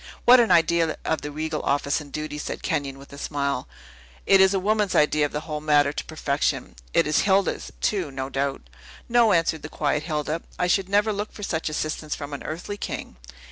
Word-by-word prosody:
"What 250 +1 +9
an 235 - +4
idea 170 -2 +3
of 160 - 0
the 145 - -5
regal 155 +1 -3
office 140 +2 0
and 145 -1 -12
duty!" 150 +1 -4
said - - -5
Kenyon, 140 -1 -2
with 140 +1 -14
a 140 - -9
smile. 140 -3 -2 0.6
"It 195 -1 +6
is 190 0 +6
a - - +2
woman's 210 0 +1
idea 150 0 +3
of - - -17
the 150 - -3
whole 150 -1 -5
matter 145 -1 +3
to - - -4
perfection. 145 - -1 0.2
It - - +3
is 150 0 +2
Hilda's, 195 -1 +1
too, 190 -7 0
no 135 -1 -4
doubt?" 135 - -3 0.4
"No," 235 -2 +4
answered 165 -3 +2
the 150 - -7
quiet 150 -1 0
Hilda; 155 0 -2 0.2
"I 180 - +1
should 185 +1 +1
never 205 +2 +2
look 205 +1 -4
for 205 - -10
such 160 -4 -2
assistance 155 0 -3
from 145 -1 -7
an 140 - -5
earthly 175 +6 -5
king." 60 - -6
155 Hz, 210 wpm, -24 LUFS, 145-190 Hz, 0.6 s, What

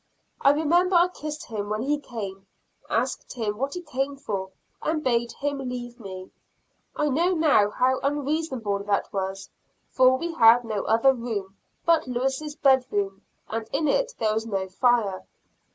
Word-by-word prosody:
I - - +6
remember 340 +5 +3
I 350 +1 +5
kissed 305 -3 -6
him 205 -3 -4
when 215 +2 -1
he 290 +2 0
came, 200 -7 -7 0.4
asked 245 +4 -1
him 215 -3 -3
what 275 +4 -2
he 355 - -5
came 275 -2 -2
for, 195 -8 -4 0.3
and 310 0 -1
bade 235 -1 +1
him 285 0 -3
leave 245 -2 -6
me. 190 -3 -8 0.6
I 300 - +1
know 340 +7 +2
now 295 -11 +4
how 255 +4 +1
unreasonable 280 -7 -1
that 205 -1 0
was, 195 0 -4 0.4
for 260 0 +5
we 335 +4 -4
had 235 -4 +6
no 215 -3 -3
other 230 +5 +4
room 215 -6 -4 0.3
but 335 -4 +3
Lewis' 265 +4 -2
bed 265 -4 +4
room, 195 -1 -2 0.3
and 225 0 -4
in 310 - 0
it - - +1
there 215 -2 +1
was 220 +1 -2
no 195 -3 -2
fire. 205 -1 +1
250 Hz, 165 wpm, -25 LUFS, 210-290 Hz, 0.6 s, I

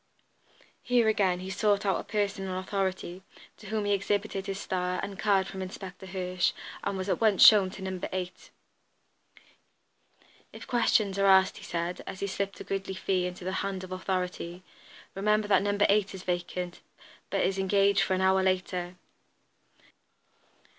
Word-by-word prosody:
Here 245 -2 +2
again 190 -4 +2
he 190 +1 -5
sought 205 0 +1
out 195 - +2
a - - -5
person 200 -2 -2
in - - -4
authority, 185 -1 -3 0.4
to 210 - -12
whom 215 0 -1
he 205 - +1
exhibited 200 0 -1
his 195 0 -3
star, 180 -2 -2
and 200 - -4
a - - -10
card 195 -2 +2
from 190 0 -7
Inspector 185 0 -8
Hirsch, 180 -1 -1 0.3
and 200 -1 -2
was 185 0 -4
at 200 - 0
once 215 -4 +6
shown 205 -4 +8
to 190 0 -9
No. 190 -1 -4
8. 185 -1 -5 2.0
"If - - -10
questions 215 -5 +2
are 195 - +4
asked," 190 -1 +5
he - - -11
said, 170 +1 -3
as 190 - -6
he - - -1
slipped 200 0 -3
a - - -6
goodly 195 0 -3
fee 185 -1 0
into 180 0 -8
the 185 - -1
hand 195 -1 -3
of 185 - -9
authority, 185 -1 -3 0.5
"remember 210 +2 +1
that 195 -2 +4
No. 205 0 0
8 205 -1 +3
is 185 - -9
vacant, 180 0 -3 0.5
but - - 0
is 195 0 0
engaged 200 +1 +3
for 190 - +1
an 185 - -1
hour 190 0 +4
later." 185 -1 -1
190 Hz, 170 wpm, -29 LUFS, 185-200 Hz, 2.0 s, shown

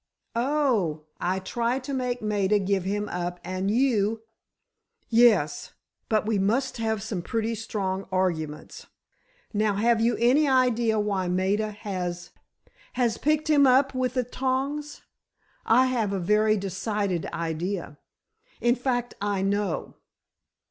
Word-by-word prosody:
"Oh—I 195 - 0
try 235 +6 -1
to 270 +1 -5
make 250 -3 -2
Maida 210 -1 +2
give 195 -2 0
him 205 +2 -1
up—and 180 +2 -3
you——" 225 -2 +1 0.9
"Yes; 225 -10 +3 0.4
but 215 -1 +2
we 215 -2 +1
must 235 +8 0
have 220 -3 -1
some 210 -5 -3
pretty 225 +4 -2
strong 195 -4 -3
arguments. 160 -5 -2 0.7
Now, 210 -1 +1
have 225 +2 +2
you 235 +1 +2
any 260 +6 +4
idea 240 -4 +2
why 200 -3 -1
Maida 190 +4 0
has——" 185 -4 -5 0.6
"Has 240 -3 0
picked 305 +1 +1
him 290 -3 +5
up 270 +2 +4
with 255 -1 -1
the 255 - +2
tongs? 270 +4 -3 0.6
I 250 +3 +5
have 230 -6 0
a 195 - -1
very 210 +4 +3
decided 195 -1 -2
idea! 165 -1 -4 0.6
In 240 0 +3
fact, 245 -1 -2
I 200 -2 0
know." 200 -2 -1
215 Hz, 125 wpm, -26 LUFS, 190-245 Hz, 0.9 s, him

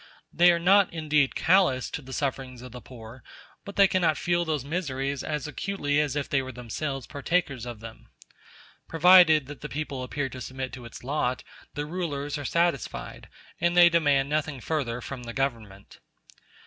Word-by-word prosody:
They 175 +1 +6
are 170 - +2
not 190 +3 +4
indeed 150 -4 +1
callous 165 -8 +2
to - - -5
the 130 -1 -12
sufferings 130 -3 -4
of 125 - -10
the 125 +1 -9
poor, 115 0 -12 0.4
but 200 - -9
they 200 -1 +6
cannot 175 -5 +1
feel 175 0 0
those 155 -5 -2
miseries 140 -4 -3
as 150 -3 -3
acutely 150 -3 -1
as 150 -2 0
if 145 -2 -2
they 135 - +1
were 130 0 -7
themselves 130 +3 -5
partakers 140 -4 -2
of 120 -3 -8
them. 115 0 -11 0.8
Provided 165 -3 +6
that 145 +1 -10
the 150 - -6
people 145 -3 -4
appear 135 +2 -3
to 130 - -9
submit 130 +1 -6
to 125 -2 -9
its 115 - -11
lot, 130 -2 -1 0.3
the 145 - -3
rulers 150 -4 -4
are 145 - -6
satisfied, 170 -2 -2 0.3
and 170 +1 +1
they 175 -1 +8
demand 145 -5 +2
nothing 150 -2 -2
further 125 -4 -2
from 135 0 -7
the 120 -1 -7
Government. 110 -7 -4
145 Hz, 175 wpm, -26 LUFS, 130-165 Hz, 0.8 s, they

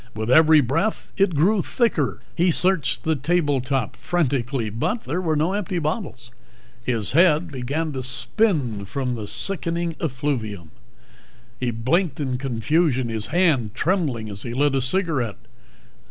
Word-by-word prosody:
With 110 +2 -2
every 155 +1 +7
breath 145 - -1
it 195 -4 +2
grew 190 +7 +3
thicker. 175 - 0
He 175 +2 +2
searched 180 -1 +1
the 160 0 +1
table 145 -1 +1
top 130 -3 -2
frantically, 135 -9 -1
but 215 - -2
there 180 - -2
were 160 -3 0
no 160 +5 +1
empty 200 -3 -2
bottles. 155 - -3 0.5
His 115 -4 -1
head 165 +1 +4
began 140 +5 -2
to 130 -2 -4
spin 125 - 0
from 130 +3 -2
the 110 -3 -5
sickening 170 - -2
effluvium. 125 - -3 0.9
He 125 - 0
blinked 130 +8 0
in 130 -4 -2
confusion, 130 +1 +1
his 110 -2 -2
hand 145 - +2
trembling 145 - 0
as 100 -1 -7
he 120 0 -4
lit 145 +1 +2
a 135 - +1
cigarette. 130 - -1
145 Hz, 145 wpm, -23 LUFS, 120-170 Hz, 0.9 s, every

